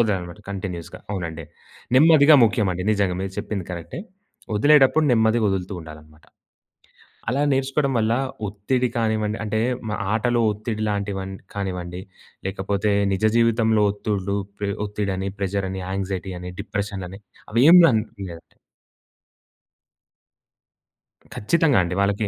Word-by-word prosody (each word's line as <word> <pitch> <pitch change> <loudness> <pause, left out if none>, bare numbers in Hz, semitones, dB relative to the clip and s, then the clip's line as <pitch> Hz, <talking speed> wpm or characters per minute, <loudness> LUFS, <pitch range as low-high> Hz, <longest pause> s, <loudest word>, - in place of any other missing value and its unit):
వదలాలనమాట 95 -4 -1
కంటిన్యూస్‌గా. 90 -4 -6
అవునండి. 85 -5 -4 0.5
నెమ్మదిగా 155 0 +7
ముఖ్యం 105 -2 +1
అండి. 90 +1 -4
నిజంగా 100 -3 +1
మీరు 95 0 -4
చెప్పింది 100 -5 -4
కరెక్టే. 85 - -6 0.5
వదిలేటప్పుడు 145 +5 +5
నెమ్మదిగా 110 0 +3
వదులుతూ 95 0 -2
ఉండాలనమాట. 75 -1 -13 1.1
అలా 135 - 0
నేర్చుకోవడం 135 +1 0
వల్ల 110 +1 +1 0.3
ఒత్తిడి 115 +6 -1
కానివ్వండి 110 -1 0
అంటే 110 +1 -1 0.3
మ - - -3 0.2
ఆటలో 120 +2 +1
ఒత్తిడి 110 +1 -4
లాంటివి 100 -1 -2
వన్ 95 0 -6 0.2
కానివ్వండి 90 -3 -4 0.5
లేకపోతే 100 +2 -1 0.2
నిజ 95 +3 -1
జీవితంలో 115 -2 +3
ఒత్తుళ్ళు, 100 -1 -2 0.2
ప్రే 100 -1 -2 0.2
ఒత్తిడిని, 100 -2 -3
ప్రెషర్ 100 0 -1
అని, 95 -1 -5
ఆంగ్జైటీ 95 -1 -3
అని, 90 0 -6
డిప్రెషన్ 100 -3 -4
అని 95 +3 -11 0.3
అవి 115 +3 +3
ఏమి 180 0 +9
లం 110 -6 +3 0.3
లేవండి. 85 0 -13 2.8
ఖచ్చితంగా 150 +4 +2
అండి 90 +1 -3
వాళ్ళకి. 100 +1 0
100 Hz, 120 wpm, -23 LUFS, 95-115 Hz, 2.8 s, ఏమి